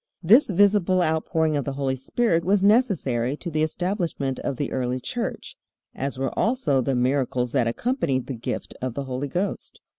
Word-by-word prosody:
This 225 - +6
visible 190 -2 +3
outpouring 160 -1 0
of 145 - 0
the 140 - -4
Holy 135 -1 -1
Spirit 165 - 0
was 195 +2 +2
necessary 160 - +2
to 170 - -6
the 155 0 0
establishment 165 -5 -2
of 135 - -3
the 145 - -3
early 125 0 -1
Church, - - -5 0.4
as 135 0 -4
were 135 -1 -1
also 215 - +1
the 130 +2 0
miracles 125 -1 0
that 130 -4 +1
accompanied 140 - -1
the 135 - -5
gift 120 -1 -5
of 125 -2 -3
the 140 - -3
Holy 130 +1 -4
Ghost. 180 +8 -3
145 Hz, 175 wpm, -24 LUFS, 130-185 Hz, 0.4 s, This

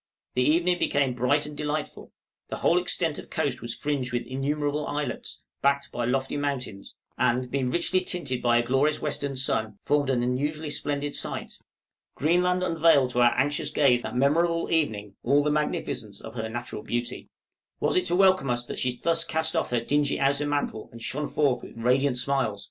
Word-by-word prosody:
The 125 - +1
evening 175 +6 +3
became 140 -3 +1
bright 125 +5 +2
and 150 0 -7
delightful; 150 0 -4 0.4
the - - -4
whole - - +3
extent - - 0
of - - -11
coast - - -1
was 120 0 -5
fringed 140 -4 -2
with 120 0 -2
innumerable 145 +3 -2
islets, 145 -3 -4 0.2
backed 140 0 +1
by 120 - -2
lofty 130 +3 -1
mountains, 130 -8 -4 0.2
and, 125 +1 +1
being 135 -2 0
richly 175 +5 +1
tinted 155 -9 -2
by 120 -1 +3
a 120 - +2
glorious 140 +5 +2
western 140 -2 -2
sun, 110 -5 0
formed 145 -2 +1
an 125 -2 +1
unusually 145 +5 -1
splendid 145 0 -2
sight. - - -3 0.6
Greenland 180 +4 +2
unveiled 165 -7 +4
to 125 - +1
our 120 0 +4
anxious 145 +3 +1
gaze 125 -4 +3
that 110 - -6
memorable 165 +5 +2
evening, 110 -11 0
all 140 +4 +3
the 150 - +1
magnificence 140 -8 -2
of 110 - -9
her 110 -2 -4
natural 120 -1 -5
beauty. 120 +2 -4 0.5
Was - - +1
it 365 - +2
to - - +1
welcome 185 -6 +4
us 120 0 0
that - - -4
she 125 -1 0
thus 165 +4 +2
cast 160 -1 -1
off - - 0
her 120 -1 0
dingy 145 +3 +1
outer 140 +1 +2
mantle, 145 -7 -2
and 115 - -11
shone 140 +6 -3
forth 135 -5 +1
radiant 125 +4 +2
with 125 - +1
smiles? 130 -6 0
140 Hz, 185 wpm, -26 LUFS, 125-150 Hz, 0.6 s, unveiled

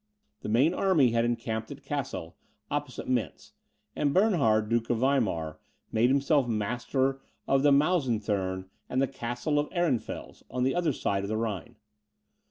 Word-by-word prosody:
The - - -5
main 130 +10 +4
army 170 -11 +3
had 115 0 +2
encamped 115 -2 -2
at - - -9
Cassel, - - -4 0.4
opposite - - -3
Mentz; 125 -3 -2 0.4
and 145 -1 0
Bernhard, 140 - +3
Duke 115 0 0
of 120 - +2
Weimar, 105 - 0 0.3
made 115 +3 +3
himself 140 0 +3
master 125 +5 -1 0.3
of 135 0 +3
the 145 0 +5
Maeusethurm 110 - +1 0.2
and 130 - 0
the 135 - +3
Castle 125 +4 -2
of 145 - -1
Ehrenfels, 170 -9 -2
on 125 - -1
the 130 - +2
other 175 -3 +1
side 100 -6 -1
of 100 - -4
the 110 - -1
Rhine. 110 +1 -3
120 Hz, 155 wpm, -28 LUFS, 110-140 Hz, 0.4 s, the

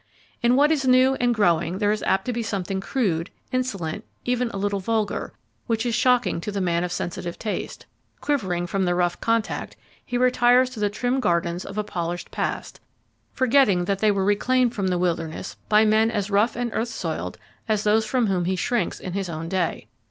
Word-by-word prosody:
In 240 +1 +4
what 290 +3 +4
is 275 -4 +1
new 255 +1 +5
and 245 0 +2
growing 175 -5 +2
there 205 0 +2
is 215 - -1
apt 190 - +1
to 250 - -1
be 235 - -2
something 195 -3 -3
crude, 190 - -1 0.2
insolent, 205 -11 -2 0.2
even 250 -1 0
a 200 - -6
little 200 0 -1
vulgar, 215 +1 -1 0.4
which 225 -1 0
is 240 - 0
shocking 245 -7 +2
to 210 - -4
the 200 - -2
man 170 -2 +1
of 180 - -3
sensitive 175 0 -4
taste; 215 - -5 0.3
quivering 185 -12 -1
from 190 +2 -1
the 175 0 +1
rough 175 0 0
contact, 230 -1 -1 0.3
he 245 - -3
retires 250 0 +4
to 240 - -8
the 205 -1 +1
trim 245 +5 -1
gardens 170 -4 0
of 200 - -8
a 210 - +1
polished 175 -3 -4
past, - - -3 0.5
forgetting 255 -9 +3
that 195 +1 -1
they 215 - +3
were 195 -2 +1
reclaimed 245 +4 +2
from 200 -5 -1
the 180 -1 +1
wilderness 165 -2 -2
by 215 +1 +5
men 220 +1 +4
as 205 -2 -2
rough 210 +4 +2
and 240 -1 -2
earth 230 +2 -1
soiled - - -4 0.3
as 215 -1 +1
those 215 +1 +3
from 240 +2 +1
whom 185 -4 0
he 185 +1 0
shrinks 240 +5 -1
in 180 - -6
his 195 -2 -2
own 165 0 -5
day. 180 -1 -2
210 Hz, 200 wpm, -24 LUFS, 180-245 Hz, 0.5 s, new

